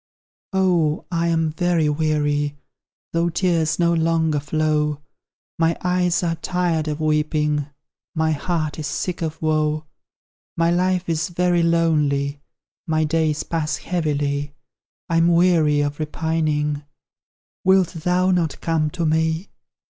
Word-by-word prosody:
Oh, 175 -5 +1
I 170 0 0
am 165 -1 +1
very 170 -1 +1
weary, 145 -1 0 0.6
Though 170 +1 +1
tears 165 -3 +1
no 170 -1 +3
longer 160 -2 +1
flow; 150 0 0 0.6
My 165 0 +2
eyes 180 0 +1
are 165 -1 0
tired 170 -2 -1
of 150 0 -3
weeping, 150 -1 0 0.5
My 160 0 +1
heart 155 0 -2
is 155 - -3
sick 175 +5 -3
of 160 -1 -3
woe; 155 0 +1 0.7
My 165 0 +3
life 180 +1 +1
is 160 -1 -1
very 175 0 +1
lonely 150 -4 +1 0.5
My 155 -1 +1
days 155 -1 0
pass 160 -2 -2
heavily, 145 -4 -2 0.5
I'm 165 0 +3
weary 165 -4 +3
of 145 +1 -2
repining; 150 -1 -1 0.8
Wilt 190 -2 +4
thou 180 +2 +1
not 175 -4 0
come 160 -2 0
to 170 0 -3
me? 160 +3 0
160 Hz, 125 wpm, -22 LUFS, 150-170 Hz, 0.8 s, Wilt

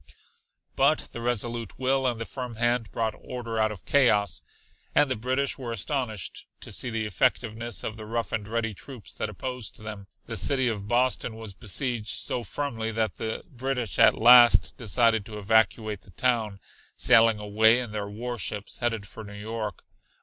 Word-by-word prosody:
But 155 - +2
the 120 - -7
resolute 120 -2 -2
will 130 0 +1
and 120 -2 -1
the 115 - -3
firm 125 -2 -6
hand 120 0 0
brought 110 -1 -1
order 115 -3 -5
out 110 0 +2
of 100 -6 -10
chaos, 105 -8 +3 0.5
and 145 -3 +4
the - - +1
British 130 +5 -1
were 120 -3 -5
astonished 115 - -3
to - - -4
see - - -2
the 110 -1 -2
effectiveness 115 +2 -1
of 110 - -4
the 110 -1 -8
rough 115 -1 -2
and 105 -3 -3
ready 110 0 -2
troops 125 +2 -10
that 110 - -3
opposed 125 +3 -5
them. 105 -2 -8 0.2
The 115 -1 -4
city 130 +6 +3
of 105 -4 -3
Boston 120 0 +1
was 110 -3 -7
besieged 115 +2 -1
so 105 +4 0
firmly 115 -1 -3
that 110 0 -1
the 110 0 -3
British 125 -5 -3
at - - +6
last 120 +1 +7
decided 115 -1 +2
to 110 -2 -7
evacuate 110 0 +1
the - - -18
town, 110 0 0 0.4
sailing 115 -3 +5
away 110 +2 +4
in 120 -4 -4
their 105 -1 -4
warships, 110 -2 -4
headed 115 -4 -1
for 110 - -10
New 105 -1 -10
York. 110 -1 -5
115 Hz, 170 wpm, -27 LUFS, 105-125 Hz, 0.5 s, last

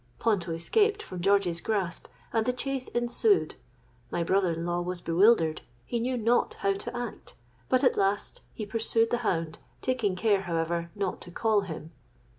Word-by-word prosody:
Ponto 195 -7 +1
escaped 415 - +1
from 180 -1 -7
George's 190 -3 +2
grasp, 195 -5 -1 0.3
and 225 0 +1
the 250 - +2
chase 265 0 -3
ensued. 240 - +2 0.6
My 170 - -1
brother 185 0 +2
in 165 +1 -4
law 175 0 0
was 180 0 -2
bewildered—he 165 - +2
knew 250 +2 -1
not 235 +1 +2
how 195 - +1
to 195 - -6
act; 240 -2 -6 0.3
but 255 +2 +3
at 255 - +4
last 200 +1 0
he 215 - -5
pursued 225 +1 +1
the 240 - +1
hound, 165 -8 -1 0.2
taking 230 -7 0
care, 200 0 +2
however, 170 -1 -1
not 200 -3 -2
to - - -9
call 215 +3 +2
him. 160 -4 -7
200 Hz, 165 wpm, -28 LUFS, 175-235 Hz, 0.6 s, at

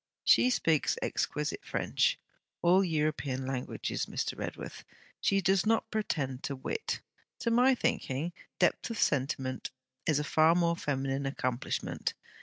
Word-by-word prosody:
'She 250 - +6
speaks 160 - +2
exquisite - - -2
French - - +1 0.5
all 180 +3 +6
European 150 -5 -1
languages, 130 -1 -3
Mr. - - -2
Redworth. - - -6 0.4
She 195 0 +2
does 190 0 +3
not 225 +1 +1
pretend 140 -12 -1
to 140 - -3
wit. 285 - -3 0.4
To 235 - +1
my 250 +3 +5
thinking, 155 - -1 0.2
depth 180 - +2
of 230 - -4
sentiment 130 -4 0 0.4
is 155 -3 +3
a 150 - 0
far 155 +2 +4
more 170 -1 +3
feminine 135 -2 -1
accomplishment. 125 -2 -2
155 Hz, 130 wpm, -31 LUFS, 135-190 Hz, 0.5 s, She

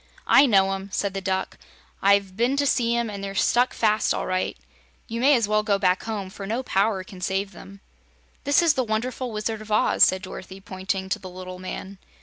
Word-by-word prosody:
"I 275 +1 +6
know 195 -4 +4
'em," 195 +1 -6
said 200 0 -1
the 195 - -4
Duck. 190 0 -2 0.4
"I've 200 -1 +3
been 245 +6 +1
to 285 - +2
see 235 -3 +2
'em, 235 -1 0
and 200 -2 -6
they're 195 0 -5
stuck 245 +5 +3
fast, 215 -1 +1
all - - -3
right. 185 0 -2 0.5
You 230 0 -4
may 280 +2 +6
as 230 -4 +1
well 215 0 +2
go 210 -2 +1
back 185 -2 +2
home, 205 -4 -4
for 195 0 -8
no 235 +5 -2
power 195 -3 +1
can 185 0 -12
save 195 +2 -1
them." 195 +1 -13 0.6
"This 285 +4 +3
is 330 -3 +4
the 260 -2 0
Wonderful 245 +3 -3
Wizard 215 0 -3
of 215 0 -10
Oz," 210 - +2
said 185 +1 +5
Dorothy, 190 0 -9
pointing 190 -1 -4
to - - -1
the 185 - -9
little 185 0 -9
man. 185 +1 -7
200 Hz, 215 wpm, -24 LUFS, 190-230 Hz, 0.6 s, I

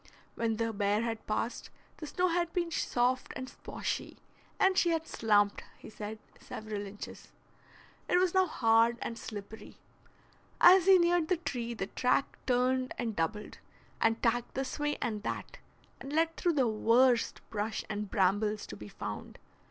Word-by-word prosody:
When 225 -1 -1
the 225 0 -1
bear 205 +2 +1
had 225 -1 -4
passed, 225 +2 -2 0.3
the 310 - -7
snow 365 +4 +1
had 345 0 0
been 345 -2 -1
soft 255 -4 0
and 260 - -5
sposhy, - - -5 0.4
and 380 0 +4
she 350 - +3
had 325 -1 0
"slumped," 205 -2 +2
he - - -12
said, 215 +1 -6 0.2
several 210 -2 -6
inches. 205 +1 -10 0.8
It 360 - +4
was 365 -1 +2
now 375 -1 +4
hard 230 -4 +3
and 230 - -4
slippery. 215 -1 -9 0.8
As 365 +1 +7
he 385 -1 +9
neared 345 -2 +3
the 365 - +2
tree 240 -8 -4
the 195 - -2
track 250 +6 0
turned 255 0 +1
and 230 -3 -2
doubled, 210 +6 -3 0.4
and 225 0 +3
tacked 240 +1 0
this 270 +3 -3
way 295 0 0
and 220 -4 -2
that, - - -5 0.4
and 275 - -8
led 325 +2 +1
through 345 - +1
the 265 -5 +2
worst 230 +3 +3
brush 210 0 -2
and 210 -1 -4
brambles 205 +2 +1
to - - -8
be 105 +1 -10
found. - - -7
235 Hz, 160 wpm, -31 LUFS, 215-310 Hz, 0.8 s, he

